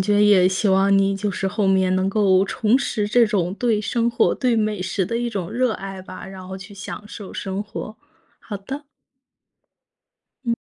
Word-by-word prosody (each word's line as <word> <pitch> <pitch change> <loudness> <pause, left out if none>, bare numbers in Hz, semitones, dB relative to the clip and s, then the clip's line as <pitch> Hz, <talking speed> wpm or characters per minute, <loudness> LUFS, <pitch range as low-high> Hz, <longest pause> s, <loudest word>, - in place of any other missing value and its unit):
觉 205 +2 +3
也 185 -3 +6
希 190 +3 0
望 195 +1 +4
你， 195 0 +2
就 205 +1 -2
是 195 0 -2
后 205 0 0
面 190 -1 +3
能 190 +1 +1
够 195 -2 +3
重 220 +4 +2
拾 210 -6 -1
这 235 +1 +5
种 190 -5 0
对 225 -3 +1
生 230 +3 0
活、 235 - +2
对 250 -3 +1
美 215 -3 0
食 190 +1 -1
的 230 +6 -2
一 240 0 -1
种 195 -7 -4
热 245 0 +1
爱 195 -1 -6
吧， 185 0 -9
然 190 -1 -9
后 190 - -6
去 190 +2 -11
享 195 +1 -7
受 205 -4 -9
生 195 0 -3
活， 210 +1 -7 0.4
好 210 - -6
的。 265 +9 -7 1.6
嗯。 235 -1 +1
200 Hz, 210 characters per minute, -22 LUFS, 190-220 Hz, 1.6 s, 也